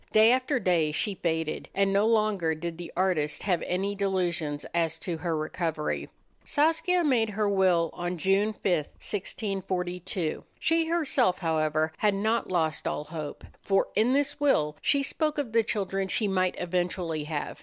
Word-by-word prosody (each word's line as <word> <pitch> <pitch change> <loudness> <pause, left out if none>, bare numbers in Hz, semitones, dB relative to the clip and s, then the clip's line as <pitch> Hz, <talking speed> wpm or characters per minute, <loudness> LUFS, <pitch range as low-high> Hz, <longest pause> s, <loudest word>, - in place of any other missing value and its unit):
Day 220 +2 +6
after 255 +1 +1
day 170 -7 +2
she 200 +7 -1
faded, 160 -4 -2
and 195 0 +2
no 200 +2 +3
longer 210 -7 +2
did 170 +1 -5
the 175 - -7
artist 170 -5 0
have 180 -4 +1
any 195 +3 -1
delusions 175 -7 -1
as 165 -2 0
to 170 0 -4
her 165 -1 -2
recovery. 155 0 -2 0.3
Saskia 330 +4 +2
made 240 -7 +2
her 210 0 0
will 185 -4 +3
on 175 +1 -3
June 195 +5 +2
5, - - -29
1642. 180 0 -2
She 325 0 +2
herself, 280 - +2
however, 155 -1 0
had 210 -2 +2
not 220 +1 0
lost 160 -3 0
all 150 - -2
hope, 155 -2 -7 0.2
for 195 -1 +1
in 225 +5 +3
this 285 +1 +1
will 155 - +2
she 280 -1 +2
spoke 305 +2 -1
of 265 -7 -3
the 230 - +5
children 195 -3 -1
she 210 +3 +1
might 185 -2 +1
eventually 175 -3 -2
have. 150 -1 -4
185 Hz, 160 wpm, -28 LUFS, 165-215 Hz, 0.3 s, Day